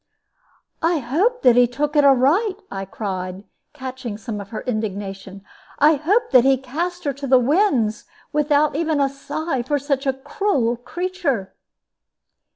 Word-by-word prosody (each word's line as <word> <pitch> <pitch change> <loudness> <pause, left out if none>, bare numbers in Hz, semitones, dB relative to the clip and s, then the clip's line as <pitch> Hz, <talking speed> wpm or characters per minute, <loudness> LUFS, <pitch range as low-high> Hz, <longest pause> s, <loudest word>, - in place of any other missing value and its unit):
"I 330 +1 +2
hope 335 - 0
that 245 -2 +6
he 245 0 +6
took 290 +5 -2
it 295 - +5
aright!" 285 - +4 0.2
I 195 0 -4
cried, 190 -1 -5 0.3
catching 255 -4 -6
some 215 -2 -5
of 200 - -11
her 225 - -5
indignation; 200 -4 -5 0.3
"I 300 +2 +5
hope 390 - +1
that 255 -3 +7
he 270 0 +4
cast 335 +8 -4
her 285 - -1
to 280 +1 -6
the 260 0 +6
winds, 250 - +1 0.3
without 295 0 +2
even 315 -1 0
a 275 -1 +2
sigh 290 0 -3
for 290 +5 -1
such 275 0 -2
a 270 - +2
cruel 265 - -1
creature!" 290 - -3
270 Hz, 155 wpm, -21 LUFS, 235-310 Hz, 0.3 s, that